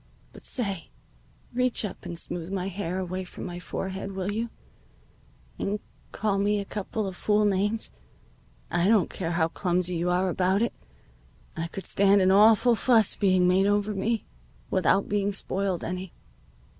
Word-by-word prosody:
But -, -, -13 dB
say, 200 Hz, -9 st, -3 dB, 0.6 s
reach 250 Hz, -2 st, +1 dB
up 200 Hz, -, -7 dB
and 170 Hz, -, -5 dB
smooth 170 Hz, +1 st, -5 dB
my 190 Hz, -1 st, -2 dB
hair 185 Hz, -2 st, -3 dB
away 185 Hz, 0 st, -3 dB
from 180 Hz, -, -8 dB
my 175 Hz, 0 st, -5 dB
forehead, 190 Hz, +2 st, -5 dB
will 190 Hz, +1 st, -2 dB
you, 225 Hz, +3 st, -2 dB, 1.1 s
and 205 Hz, +1 st, -1 dB, 0.3 s
call 200 Hz, -1 st, 0 dB
me 205 Hz, +1 st, +2 dB
a 200 Hz, -, -4 dB
couple 210 Hz, +1 st, -3 dB
of 190 Hz, -2 st, -5 dB
fool 210 Hz, +3 st, +2 dB
names. 205 Hz, +2 st, +1 dB, 0.8 s
I 175 Hz, +2 st, +2 dB
don't 210 Hz, -4 st, +3 dB
care 170 Hz, -2 st, -3 dB
how 165 Hz, -1 st, +2 dB
clumsy 180 Hz, 0 st, -1 dB
you 175 Hz, +2 st, 0 dB
are 180 Hz, +1 st, +2 dB
about 185 Hz, +3 st, +2 dB
it. 235 Hz, -, -1 dB, 0.8 s
I 165 Hz, 0 st, -3 dB
could 190 Hz, +3 st, -7 dB
stand 200 Hz, 0 st, +4 dB
an 185 Hz, 0 st, +4 dB
awful 220 Hz, +4 st, +6 dB
fuss 225 Hz, -2 st, +3 dB
being 185 Hz, -3 st, +3 dB
made 190 Hz, +2 st, +4 dB
over 205 Hz, +1 st, +1 dB
me, 215 Hz, +3 st, -1 dB, 0.5 s
without 190 Hz, +1 st, +3 dB
being 205 Hz, 0 st, 0 dB
spoiled 195 Hz, -2 st, -1 dB
any." 185 Hz, 0 st, -5 dB
195 Hz, 160 wpm, -27 LUFS, 180-210 Hz, 1.1 s, awful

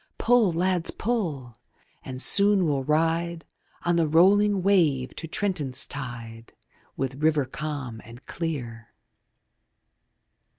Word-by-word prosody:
Pull, 235 Hz, -5 st, +3 dB
lads, 180 Hz, 0 st, 0 dB
pull! 160 Hz, -, -3 dB, 0.5 s
and 130 Hz, 0 st, -6 dB
soon 200 Hz, -2 st, +5 dB
we'll 140 Hz, -4 st, 0 dB
ride 165 Hz, +3 st, 0 dB, 0.4 s
On 175 Hz, 0 st, +1 dB
the 165 Hz, -2 st, +2 dB
rolling 195 Hz, +5 st, +4 dB
wave 160 Hz, -10 st, +2 dB
to 165 Hz, -, -6 dB
Trenton's 160 Hz, -8 st, -1 dB
tide 115 Hz, -4 st, -8 dB, 0.4 s
With 135 Hz, +1 st, -4 dB
river 155 Hz, -3 st, +2 dB
calm 135 Hz, -5 st, -6 dB
and 120 Hz, +4 st, -14 dB
clear. 120 Hz, -9 st, -6 dB
155 Hz, 110 wpm, -25 LUFS, 130-180 Hz, 0.5 s, soon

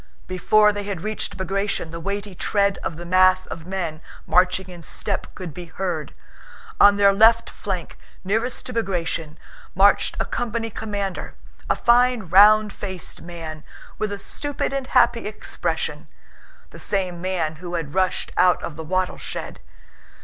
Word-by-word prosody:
Before 210 Hz, +4 st, +3 dB
they 205 Hz, -, -3 dB
had 200 Hz, -4 st, -5 dB
reached 215 Hz, -2 st, -4 dB
Bagratión, 195 Hz, -2 st, -2 dB
the 165 Hz, -, -6 dB
weighty 200 Hz, +3 st, -4 dB
tread 200 Hz, +2 st, +1 dB
of 160 Hz, -, -4 dB
the 175 Hz, -, -7 dB
mass 185 Hz, +1 st, +4 dB
of 165 Hz, +1 st, -8 dB
men 175 Hz, -5 st, -3 dB, 0.2 s
marching 185 Hz, +1 st, +2 dB
in 175 Hz, -2 st, -10 dB
step 195 Hz, +4 st, -2 dB
could 180 Hz, -5 st, -7 dB
be 175 Hz, +2 st, -8 dB
heard. 165 Hz, -3 st, -4 dB, 0.6 s
On 205 Hz, 0 st, +8 dB
their 200 Hz, -1 st, +5 dB
left 225 Hz, +3 st, +5 dB
flank, -, -, -5 dB, 0.2 s
nearest 225 Hz, +6 st, -1 dB
to 250 Hz, -, -6 dB
Bagratión, 170 Hz, -8 st, -2 dB, 0.4 s
marched -, -, +4 dB
a -, -, 0 dB
company 230 Hz, -1 st, -3 dB
commander, 205 Hz, -3 st, -4 dB, 0.3 s
a -, -, +3 dB
fine 245 Hz, -1 st, +3 dB
round 210 Hz, +3 st, +7 dB
faced 190 Hz, -3 st, -6 dB
man, 160 Hz, -3 st, -8 dB, 0.4 s
with 215 Hz, -1 st, -1 dB
a 200 Hz, -, -3 dB
stupid 285 Hz, +7 st, -3 dB
and 270 Hz, -1 st, -2 dB
happy -, -, +3 dB
expression—the -, -, -6 dB
same 185 Hz, -4 st, -2 dB
man 170 Hz, -4 st, -1 dB
who 175 Hz, +1 st, -6 dB
had 155 Hz, -4 st, -4 dB
rushed 185 Hz, -1 st, 0 dB
out 180 Hz, -1 st, +4 dB
of 150 Hz, -, -6 dB
the 160 Hz, -, -5 dB
wattle 185 Hz, +3 st, -1 dB
shed. -, -, -6 dB
190 Hz, 150 wpm, -23 LUFS, 175-210 Hz, 0.6 s, On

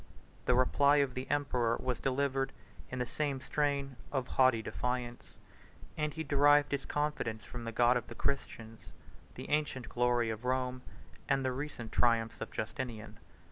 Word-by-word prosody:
The 125 Hz, -, +4 dB
reply 140 Hz, +3 st, +4 dB
of 140 Hz, -3 st, +2 dB
the 130 Hz, +1 st, -5 dB
emperor 125 Hz, -5 st, +1 dB
was 125 Hz, -2 st, -2 dB
delivered 135 Hz, 0 st, 0 dB, 0.4 s
in 130 Hz, -, -5 dB
the 125 Hz, -, 0 dB
same 140 Hz, +1 st, -2 dB
strain 140 Hz, -1 st, -1 dB
of 130 Hz, -3 st, -2 dB
haughty 130 Hz, -4 st, +4 dB
defiance, 125 Hz, 0 st, -4 dB, 0.6 s
and 150 Hz, -1 st, -1 dB
he 160 Hz, +1 st, -4 dB
derived 145 Hz, 0 st, +4 dB
his 140 Hz, -1 st, -1 dB
confidence 135 Hz, -8 st, -2 dB
from 120 Hz, +2 st, -7 dB
the 115 Hz, -, -3 dB
God 120 Hz, +2 st, +4 dB
of 120 Hz, -1 st, -1 dB
the -, -, -9 dB
Christians, 115 Hz, -5 st, -4 dB, 0.4 s
the -, -, -7 dB
ancient 145 Hz, -5 st, 0 dB
glory 120 Hz, -1 st, +2 dB
of 110 Hz, +2 st, -6 dB
Rome, 125 Hz, 0 st, -1 dB, 0.5 s
and 135 Hz, -1 st, +2 dB
the 130 Hz, -, +1 dB
recent 130 Hz, -3 st, -5 dB
triumphs 115 Hz, -2 st, +2 dB
of -, -, -4 dB
Justinian. 110 Hz, -1 st, -5 dB
130 Hz, 160 wpm, -33 LUFS, 120-140 Hz, 0.6 s, The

